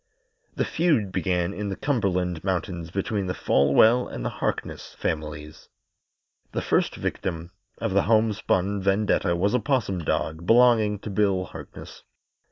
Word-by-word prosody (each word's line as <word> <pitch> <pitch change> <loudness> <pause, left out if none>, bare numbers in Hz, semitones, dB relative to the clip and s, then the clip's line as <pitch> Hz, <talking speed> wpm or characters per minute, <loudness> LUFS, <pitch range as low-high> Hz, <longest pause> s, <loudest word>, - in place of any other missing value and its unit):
The - - 0
feud 150 - +1
began 90 -1 -1
in 105 0 -4
the 95 - -3
Cumberland 90 - -1
Mountains 90 -3 -2
between 100 +2 -2
the 90 - -2
Folwell 110 - +4
and - - -6
the - - -1
Harkness - - -3
families. 75 -1 -5 0.8
The - - -1
first - - +1
victim 85 -1 -4 0.3
of 115 -4 -2
the 100 - +4
homespun 105 -3 +1
vendetta 100 -2 +1
was 100 +4 +1
a 125 - +3
'possum 120 -10 0
dog 80 +1 -2
belonging 115 -3 +5
to 105 - -6
Bill 100 -2 +1
Harkness. - - -11
95 Hz, 140 wpm, -25 LUFS, 90-110 Hz, 0.8 s, belonging